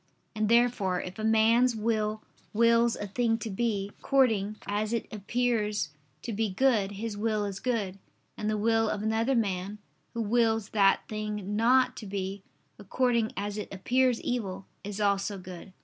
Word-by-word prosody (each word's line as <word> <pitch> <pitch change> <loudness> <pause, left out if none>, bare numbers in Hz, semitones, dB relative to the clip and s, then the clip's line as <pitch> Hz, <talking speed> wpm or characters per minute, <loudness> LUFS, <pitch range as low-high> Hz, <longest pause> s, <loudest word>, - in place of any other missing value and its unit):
And 215 -1 0
therefore 235 -6 +3
if 185 +3 -7
a - - -4
man's 225 +3 +4
will 215 -1 -1 0.3
wills 230 +1 +4
a 205 - -5
thing 225 +3 0
to 225 -1 -5
be, 200 -1 -1
according 220 -7 +2
as 210 +2 -1
it 230 - -1
appears 210 -3 0 0.3
to 230 - -4
be 220 +1 0
good, 205 -2 +2
his 215 +1 -4
will 210 0 0
is 195 -1 -5
good: 205 -6 -2 0.4
and 210 - -3
the 215 - 0
will 225 +1 +2
of 210 -1 -2
another 225 +4 +1
man, 200 -2 -1 0.4
who 230 - -1
wills 225 -1 +1
that 200 -2 +3
thing 210 -2 -4
not 250 +3 +3
to 215 - -7
be, 195 0 -4 0.4
according 235 +2 +1
as 205 +1 -3
it - - -6
appears 245 +5 +1
evil, 195 -6 -3 0.2
is 205 +1 -5
also 200 0 +1
good. 185 0 -10
215 Hz, 165 wpm, -28 LUFS, 200-230 Hz, 0.4 s, man's